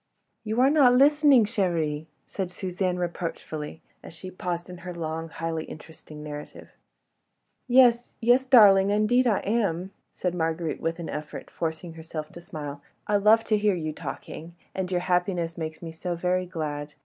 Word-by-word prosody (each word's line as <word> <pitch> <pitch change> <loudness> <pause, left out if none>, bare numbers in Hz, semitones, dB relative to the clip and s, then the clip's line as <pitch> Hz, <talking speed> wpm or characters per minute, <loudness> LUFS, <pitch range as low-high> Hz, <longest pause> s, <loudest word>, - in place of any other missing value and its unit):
"You 220 +1 -2
are 270 +2 +5
not 270 -5 +6
listening, 285 -3 +6
chérie," 165 -8 -1 0.2
said 190 -3 -4
Suzanne, 180 0 -2
reproachfully, 165 -3 -5 0.2
as - - -12
she 185 +2 -9
paused 175 -2 -4
in 180 -1 -9
her 180 -1 -7
long, 165 0 -4
highly 165 -1 -3
interesting 155 -1 -11
narrative. 150 -1 -9 1.0
"Yes, 245 -1 +4
yes, 245 +3 +3
darling—indeed 210 +1 +5
I 215 -4 +2
am," 195 -4 -1 0.2
said 180 -1 -3
Marguerite 165 -1 -2
with 165 0 -1
an 170 -2 -6
effort, 150 0 -7
forcing 165 +1 -4
herself 160 -1 -7
to 170 - -11
smile. 145 -4 -7 0.2
"I 210 - +2
love 215 +3 +5
to 215 -2 +1
hear 205 -2 +2
you 155 -3 -3
talking... 160 +3 -8 0.2
and 190 -1 -3
your 180 -1 0
happiness 180 -2 0
makes 160 0 -6
me 165 - -6
so 175 +2 -4
very 180 +1 0
glad. 150 -4 -5
180 Hz, 160 wpm, -26 LUFS, 160-205 Hz, 1.0 s, not